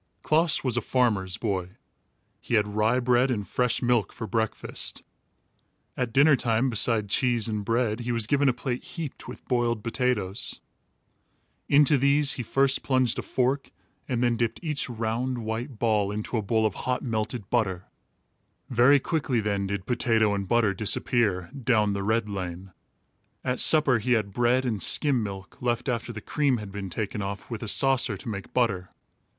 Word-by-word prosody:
Klaas 160 +1 +2
was 125 -3 0
a - - +2
farmer's 105 -7 0
boy. 95 -4 -3 0.6
He 120 - -2
had 105 -1 +3
rye 110 +4 +1
bread 125 +1 +2
and 105 -5 -2
fresh 125 -1 0
milk 120 -3 +2
for 110 - -6
breakfast. 110 -1 -3 0.9
At 125 -2 -2
dinner 140 +4 +5
time, 120 +1 +1
beside 110 -1 +1
cheese 120 +1 +1
and 105 -2 -2
bread, 115 0 0
he 120 0 -3
was 115 -2 -1
given 140 +3 +2
a - - +4
plate 125 0 -4
heaped 160 -5 -7
with - - -10
boiled 120 -3 0
potatoes. 115 -5 -1 1.1
Into 145 0 +5
these 140 +1 +3
he - - -4
first 135 +3 +2
plunged 130 -3 +1
a - - -1
fork 130 +2 -1 0.4
and 125 -2 0
then 120 -1 +2
dipped 115 -1 -1
each 150 -5 -2
round, 120 +2 -2
white 115 +3 -4
ball 105 -3 +1
into 105 +4 -4
a 110 - +1
bowl 110 +2 +1
of 105 - +1
hot 125 +4 -2
melted 110 -2 -3
butter. 95 -7 0 0.9
Very 125 +4 +5
quickly 135 -5 -1
then 100 -2 -1
did 100 -1 -4
potato 115 -3 +2
and 100 -1 -3
butter 115 -2 +2
disappear 100 -1 0
"down 115 -6 +1
the 100 - -2
red 110 +2 0
lane." 95 -2 -6 0.7
At 125 -1 -1
supper, 150 -6 +5
he 125 +4 +1
had 105 -4 0
bread 120 +3 +2
and 110 -5 -2
skim 140 -5 +3
milk, 100 -2 -7
left 120 0 -1
after 120 -1 -2
the 105 -2 -7
cream 140 +2 +1
had 105 -3 -8
been 100 -1 -6
taken 105 +2 -3
off, 100 +3 -6
with 115 - -4
a 115 - -5
saucer, 125 -2 +2
to - - -12
make 100 -3 -6
butter. 100 -7 0
115 Hz, 175 wpm, -26 LUFS, 105-125 Hz, 1.1 s, dinner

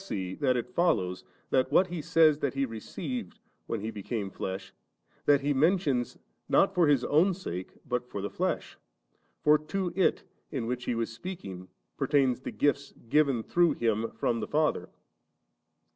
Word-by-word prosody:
• - - -12
Or,u^ - - -14
see 95 - -3
that 130 -1 +1
it 125 +10 -4
follows, 95 - +1 0.3
that 130 0 +2
what 180 - +5
He 175 -3 -5
says 160 -2 +4
that 140 -3 -1
He 135 0 +1
received, 130 - -6 0.3
when 115 - -2
He 110 +2 -3
became 105 -1 -4
flesh, 95 0 -5 0.5
that 145 -1 +5
He 145 +1 +1
mentions, 140 -4 +1 0.3
not 195 - +4
for 175 -4 +4
His 140 -4 +3
own 175 +6 +3
sake, 95 - -6
but 125 -1 -2
for - - -5
the 100 +1 -3
flesh? - - -2 0.6
for 150 0 +6
to 175 +3 -3
it, 190 - +2 0.3
in 130 -6 -3
which 125 +1 -3
He 120 - 0
was 115 0 -2
speaking, 100 - -7 0.3
per - - -1
tained 135 -4 +2
the - - -5
gifts 140 -1 0
given 140 -5 +3
tlirough 175 +5 +2
Him 115 -1 0
from 115 - 0
the - - -3
Father. 155 0 0
135 Hz, 175 wpm, -29 LUFS, 115-160 Hz, 0.6 s, for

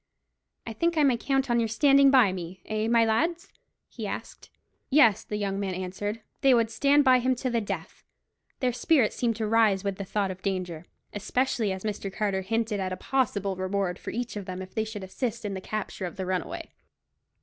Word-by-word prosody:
"I 225 - -5
think 335 +8 0
I 305 - +5
may 265 -3 +4
count 270 +3 0
on 240 -1 +2
your 230 - +1
standing 275 +4 +5
by 255 -7 +5
me—eh, 185 +5 -4
my 230 0 +4
lads?" 330 - 0 0.3
he - - -6
asked. - - -7 0.4
Yes, 245 -8 +5
the 210 - -4
young 200 -1 -2
men 190 -2 -2
answered; 190 +4 -4 0.2
they 270 -2 +6
would 230 -1 +2
stand 285 +4 +4
by 255 -2 +6
him 255 +1 +1
to 255 +1 -2
the 235 -1 +1
death. 195 -5 -6 0.6
Their 250 -2 +1
spirits 250 -1 +2
seemed 235 -2 0
to 220 0 -2
rise 215 -3 +3
with 200 -2 -2
the 200 - -4
thought 195 0 -1
of 185 0 -9
danger, 180 -4 -3 0.3
especially 220 +1 0
as 190 0 -5
Mr. 205 -2 -3
Carter 195 -1 -1
hinted 225 +1 -1
at 190 -1 -2
a 185 - -3
possible 205 -6 0
reward 185 -1 -2
for - - -7
each 240 +1 -4
of 205 -2 -5
them 185 -1 -6
if 185 - -13
they 220 - -1
should 215 -2 -7
assist 230 +4 -4
in 200 - -2
the 190 - -5
capture 205 -2 -4
of 175 - -9
the 190 -2 -4
runaway. 185 -1 -3
215 Hz, 205 wpm, -27 LUFS, 190-245 Hz, 0.6 s, they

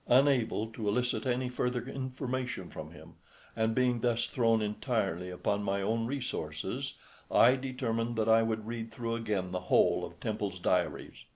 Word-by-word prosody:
Unable 125 -4 +4
to 110 -1 -4
elicit 125 +5 0
any 125 0 +1
further 125 0 -1
information 130 -1 -4
from - - -7
him, - - -14 0.4
and 110 0 +1
being 125 -2 +2
thus 120 -1 +2
thrown 115 -3 +2
entirely 105 -5 -1
upon 100 +3 -1
my 100 -1 0
own 115 +3 0
resources, 120 - -3 0.3
I 125 +2 +6
determined 120 -3 -2
that 110 -1 +1
I 115 0 +6
would 110 -1 -1
read 115 0 -4
through 115 0 -3
again 105 -5 -1
the 90 - -1
whole - - +4
of - - -8
Temple's - - -2
diaries. - - -1
115 Hz, 160 wpm, -31 LUFS, 110-125 Hz, 0.4 s, I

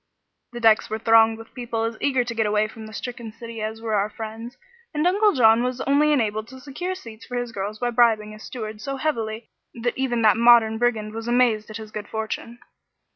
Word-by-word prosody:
The 240 - -5
decks 225 -1 +4
were 220 - -2
thronged 225 0 +5
with 225 0 -13
people 235 -3 -3
as 225 0 -2
eager 265 -3 +2
to 240 -1 -5
get 225 -2 0
away 210 +1 +2
from 220 0 -10
the - - -11
stricken 240 -1 -6
city 230 0 -8
as 220 +1 -5
were 220 -1 -2
our 205 0 +1
friends, 225 +2 -8 0.4
and 300 +2 +1
Uncle 410 +4 +4
John 225 -3 +5
was 250 0 -2
only 290 +2 +3
enabled 220 -6 0
to 260 +2 -12
secure 325 +8 -5
seats 230 -10 -11
for 245 - -4
his 245 -1 -3
girls 205 0 -4
by 245 +2 -1
bribing 225 -3 +3
a 215 - -11
steward 215 -2 -7
so 275 +2 -4
heavily 230 -6 -3 0.2
that 240 0 -2
even 240 -3 -1
that 215 0 +5
modern 230 -2 +5
brigand 220 -3 0
was 225 +1 -6
amazed 240 -3 +2
at 215 - -6
his 215 -1 -10
good 210 -1 -6
fortune. 220 +2 -5
225 Hz, 220 wpm, -23 LUFS, 220-245 Hz, 0.4 s, thronged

